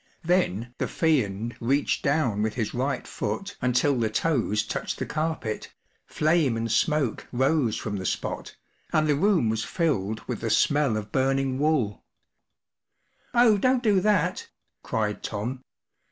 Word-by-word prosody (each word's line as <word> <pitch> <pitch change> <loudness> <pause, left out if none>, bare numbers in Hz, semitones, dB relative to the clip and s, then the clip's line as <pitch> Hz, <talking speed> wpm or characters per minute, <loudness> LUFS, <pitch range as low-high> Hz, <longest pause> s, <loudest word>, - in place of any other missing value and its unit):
Then 120 - 0
the - - 0
Fiend 120 -8 0
reached 135 +4 +1
down 140 -8 +1
with 110 0 -1
his 110 -4 -2
right 130 +2 -2
foot 200 0 -4
until 125 +2 +2
the 110 -2 +1
toes 110 -4 +1
touched - - -4
the - - -3
carpet; 155 -8 -3 0.4
flame 155 -6 +2
and 115 0 -2
smoke 150 -6 +1
rose 130 -1 +1
from 105 -2 -4
the 95 - -5
spot, - - -4 0.4
and 155 0 +3
the 150 -1 +3
room 175 - +3
was 110 0 0
filled 110 - -1
with - - -5
the - - -1
smell 145 -6 +2
of 105 -1 -6
burning 135 0 +1
wool, 140 -9 +1 1.3
44 240 - +5
Oh, 220 -4 +5
don't 255 +3 +2
do 205 -4 +3
that/' 185 -4 +1 0.3
cried 105 -2 -2
Tom. 120 +5 -4
135 Hz, 150 wpm, -26 LUFS, 110-160 Hz, 1.3 s, 44